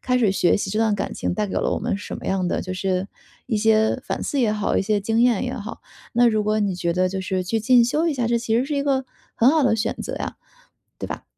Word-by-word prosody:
开 250 -1 0
始 215 -6 +3
学 180 - +3
习 200 -1 -3
这 215 - -1
段 220 -2 +2
感 200 - -3
情 - - -2
带 210 +2 -1
给 195 - -6
了 - - 0
我 - - -1
们 - - -2
什 - - -7
么 - - -9
样 190 -1 0
的 - - -1
就 185 - -5
是， 185 0 -1 0.4
一 225 -4 0
些 220 +3 +3
反 - - -3
思 280 - -1
也 225 -4 +2
好， 210 -1 -1
一 - - +1
些 205 +1 0
经 225 +3 0
验 240 -2 +3
也 255 0 -3
好。 215 -2 -7 0.3
那 240 +1 +4
如 215 -2 +2
果 215 0 +1
你 200 -3 0
觉 170 -1 -1
得 185 +1 +1
就 190 +1 -3
是 185 0 -2
去 220 +4 -1
进 245 +1 +5
修 300 +7 0
一 310 - 0
下， 245 -3 -1
这 235 0 +1
其 230 -1 0
实 245 - +2
是 290 +1 -3
一 280 - +1
个 270 -2 0 0.3
很 240 +3 +5
好 315 -1 +3
的 230 -3 +3
选 215 - -1
择 - - -4
呀， - - -5 0.7
对 - - -5
吧？ - - -6
220 Hz, 305 characters per minute, -22 LUFS, 195-245 Hz, 0.7 s, 进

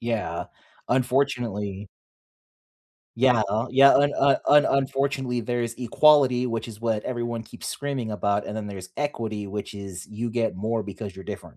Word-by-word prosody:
Yeah, 110 -8 -2 0.4
unfortunately. 120 -6 0 1.3
Yeah, 125 -2 +4
uh, 110 +4 0
yeah, 135 +2 +7
un 145 +1 +4
uh, 140 0 +5
un 145 0 +6
unfortunately 135 -2 0
there 120 +1 -2
is 115 0 -3
equality, 130 0 +4
which 115 -1 -3
is 110 0 -11
what 110 -2 0
everyone 120 -2 -3
keeps - - -10
screaming 135 -5 -3
about, 100 -1 0
and 105 - -5
then 110 -1 -4
there's 95 -2 -8
equity, 110 -8 -3
which 105 +3 -5
is 95 -3 -8
you 110 +3 -4
get 115 -2 -1
more 110 +3 -1
because 100 0 -7
you're 95 - -9
different. - - -8
115 Hz, 160 wpm, -25 LUFS, 105-130 Hz, 1.3 s, yeah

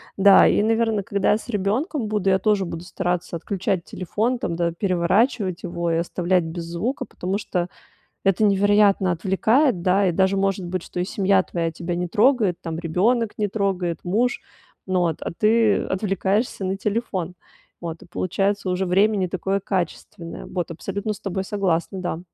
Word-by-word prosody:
Да, 195 0 +7
и, - - +3
наверно, 225 -1 +1
когда 200 0 +1
я 210 - +3
с 235 - -12
ребёнком 225 - -1
буду, 210 -2 0
я 190 0 +3
тоже 205 -1 +2
буду 170 -1 -6
стараться 180 -2 -2
отключать 190 0 -2
телефон 220 +7 -2
там, 170 - -2
да, 170 0 0
переворачивать 185 +2 +1
его 170 -1 -2
и 165 - +1
оставлять 175 +1 0
без 165 +1 -5
звука, 170 +11 -3
потому 190 +3 -3
что 180 -4 -2 0.6
это 195 +2 +3
невероятно 200 -1 +4
отвлекает, 195 - +2
да. 190 +2 +3
И - - +2
даже 190 +2 +2
может 195 -1 0
быть, 180 +1 -3
что 180 - -6
и - - +1
семья 195 0 +2
твоя 165 -2 -2
тебя 170 +1 -4
не 180 0 -2
трогает, 215 -3 +2
там 165 -1 -4
ребёнок 205 +7 +1
не 210 -1 0
трогает, 190 -4 -1
муж, 235 +8 +1 0.5
ну 185 -2 +1
от 160 - -4
а - - -3
ты 220 -1 +4
отвлекаешься 195 +2 -1
на 190 +1 -1
телефон. 200 -4 -2 0.5
Вот, 165 -1 -6
и - - -13
получается 195 +3 -1
уже 185 +1 0
время 205 +4 +3
не 185 -2 0
такое 195 +2 -1
качественное. 175 -3 -4
Вот, 175 -2 -4
абсолютно 200 +5 -4
с 200 - -12
тобой 190 -1 -3
согласна, 190 -2 -1
да. 175 -2 -3
190 Hz, 175 wpm, -23 LUFS, 175-205 Hz, 0.6 s, Да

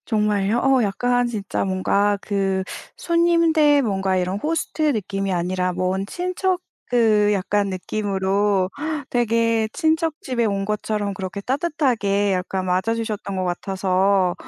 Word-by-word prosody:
정말요? 210 -1 +1
어 270 -2 +4
약간 245 +4 +1
진짜 210 -4 -3
뭔가 200 +2 +1
그 195 -2 -1 0.3
손님들 335 -4 +3
뭔가 195 -4 0
이런 185 +2 -1
호스트 315 +4 -2
느낌이 195 -2 -2
아니라 180 +1 -1
먼 185 +2 -1
친척 365 - -1 0.3
그 215 -4 +3
약간 200 +1 0
느낌으로 195 0 0 0.4
되게 230 -2 +1
친척 320 0 +1
집에 245 -3 -1
온 200 -2 0
것처럼 210 -1 -2
그렇게 190 +1 -5
따뜻하게 245 -7 0
약간 185 0 -2
맞아 185 +5 +1
주셨던 215 -4 -4
것 185 - -1
같아서 190 0 +1
205 Hz, 270 characters per minute, -22 LUFS, 190-240 Hz, 0.4 s, 어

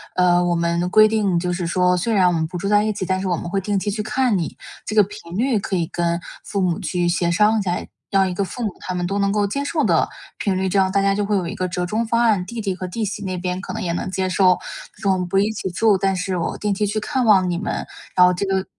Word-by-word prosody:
呃， 180 -1 +4
我 175 -1 +1
们 170 +1 0
规 215 +3 +6
定 205 -5 +1
就 180 0 -1
是 175 -1 -2
说： 180 +1 +2
“虽 205 +6 -1
然 190 -4 +4
我 180 - +2
们 160 -1 0
不 180 - -6
住 195 - -3
在 205 0 +4
一 215 - 0
起， 190 -2 -4
但 185 +1 -1
是 195 - -2
我 175 -3 0
们 175 - -6
会 195 +2 -1
定 205 +1 -1
期 205 +1 -2
去 210 - -2
看 250 0 +1
你。” 170 -4 -3 0.3
这 215 - -5
个 210 - +7
频 195 -3 -8
率 240 -2 +2
可 195 - -3
以 170 -2 +1
跟 170 +1 -1 0.2
父 200 - -3
母 180 -3 0
去 175 -1 -1
协 170 0 +1
商 215 +3 +3
一 - - 0
下， 180 -2 -1 0.3
让 195 -1 +3
一 - - -3
个 200 - -1
父 240 +7 -6
母 215 - 0
他 185 - -5
们 175 0 -1
都 200 +2 -1
能 200 0 +2
够 205 -1 +1
接 275 +8 -2
受 300 +2 0
的 - - +3 0.3
频 190 -3 -1
率， 190 0 0
这 195 +1 +2
样 190 - +3
大 200 - +2
家 195 0 +2
就 205 +1 -1
会 205 0 0
有 185 -3 0
一 - - -4
个 185 0 -2
折 180 0 -2
中 220 +5 -1
方 230 +1 +1
案， 210 -6 +2
弟 230 +3 -5
弟 195 -2 -1
和 185 0 -6
弟 220 +5 -4
媳 205 0 -4
那 185 -1 -3
边 180 +1 -3
可 - - -6
能 - - -4
也 170 - -1
能 185 - -3
接 190 0 -1
受， 185 0 +4 0.4
就 200 - -1
“我 190 - +2
们 180 - -2
不 195 +2 0
一 205 +2 +2
起 195 -3 -4
住， 210 +2 +3
但 195 +1 +1
是 185 0 -2
我 170 - -2
定 210 -1 -1
期 210 +2 0
去 215 +2 -1
看 250 +4 -1
望 190 -4 +5
你 175 - -1
们”。 200 - -3 0.3
然 180 - +7
后 180 - +4
这 190 +3 -2
个 190 -1 0
190 Hz, 330 characters per minute, -21 LUFS, 180-210 Hz, 0.4 s, 个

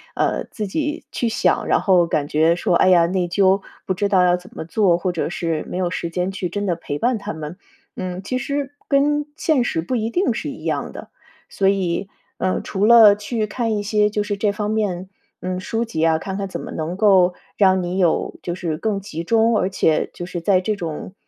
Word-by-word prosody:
呃， - - 0
自 215 - -5
己 300 +9 -3
去 235 - -1
想， - - +1
然 - - +3
后 180 -3 +4
感 150 -3 -1
觉， 160 +3 +3
说， 175 - +1
唉 185 - +4
呀， 175 -2 +6
内 180 +1 0
疚 190 +2 +3 0.2
不 185 - 0
知 200 +2 -1
道 190 -2 +4
要 180 0 +4
怎 180 +1 -10
么 - - -5
做， 175 0 +2
或 180 +1 -1
者 170 -2 -2
是 165 -2 -2
没 - - -4
有 180 -2 -1
时 170 -2 -3
间 180 +2 -2
去 190 -2 -4
真 205 +4 -3
的 180 -3 0
陪 145 -2 -5
伴 240 +5 +1
他 205 +1 -5
们， 155 +3 -7 0.4
嗯， 185 0 -5
其 255 +6 -2
实 280 +1 -3 0.2
跟 295 +1 +2
现 310 -6 +2
实 165 -8 -1
不 250 - -2
一 225 -1 -1
定 360 +11 +1
是 - - -4
一 - - -9
样 - - -2
的。 - - -10 0.4
所 195 -1 +2
以， 195 -1 -1 0.3
嗯， 185 - 0
除 200 +2 0
了 225 -3 +8
去 215 +2 -2
看 225 0 -2
一 205 - -2
些， 210 0 +2
就 210 0 -1
是 205 0 -2
这 205 +1 +1
方 210 0 -3
面， 190 -4 -2 0.3
嗯， 185 0 -3
书 225 +5 -2
籍 160 -8 -2
啊， 165 -1 +4
看 190 +4 -5
看 200 -1 -3
怎 - - -5
么 - - -7
能 160 +3 -4
够 190 -4 +4 0.2
让 190 -2 +3
你 180 +2 -2
有 175 -4 +1
就 175 - -4
是 165 -4 -3
更 210 +2 -1
集 170 -4 -6
中， 225 +4 +3
而 185 - 0
且 160 -5 +1
就 175 - -7
是 175 -1 -5
在 185 +2 +3
这 210 +3 -1
种 170 -1 -6
190 Hz, 245 characters per minute, -21 LUFS, 175-215 Hz, 0.4 s, 了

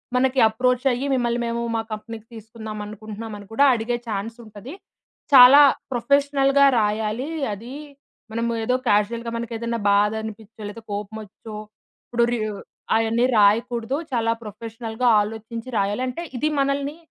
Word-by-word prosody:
మనకి 260 +1 +2
అప్రోచయ్యి, 250 +3 0
మిమ్మల్ని 240 -2 0
మేము 235 0 -2
మా 225 - 0
కంపెనీకి 220 +1 -7
తీసుకుందాం 220 -1 -8
అనుకుంటున్నామని 215 0 -8
కూడా 280 - +4
అడిగే 235 +1 -2
ఛాన్సుంటది. 225 - -6 0.6
చాలా 265 +2 +10 0.3
ప్రొఫెషనల్‌గా 280 +2 +3
రాయాలి. 215 +4 -1 0.3
అది 230 +5 -9 0.6
మనము 230 +1 -1
ఏదో 250 +3 +1
కాజుయల్‌గా 230 +3 +1
మనకేదైనా 235 0 -3
బాధ 205 +1 +3
అనిపించో, 220 0 -10
లేదా 225 +2 -10
కోపమొచ్చో, 210 +1 -7 0.5
ఇప్పుడు 235 0 +2
రి 240 - -1 0.6
అవన్నీ 225 +2 +2
రాయకూడదు, 230 +5 +2 0.2
చాలా 230 -1 +1
ప్రొఫెషనల్‌గా 225 +2 -4
ఆలోచించి 225 +3 -6
రాయాలంటే, 250 +10 -2
ఇది 305 +5 0
మనల్ని, 275 +2 -1
230 Hz, 115 wpm, -23 LUFS, 215-250 Hz, 0.6 s, చాలా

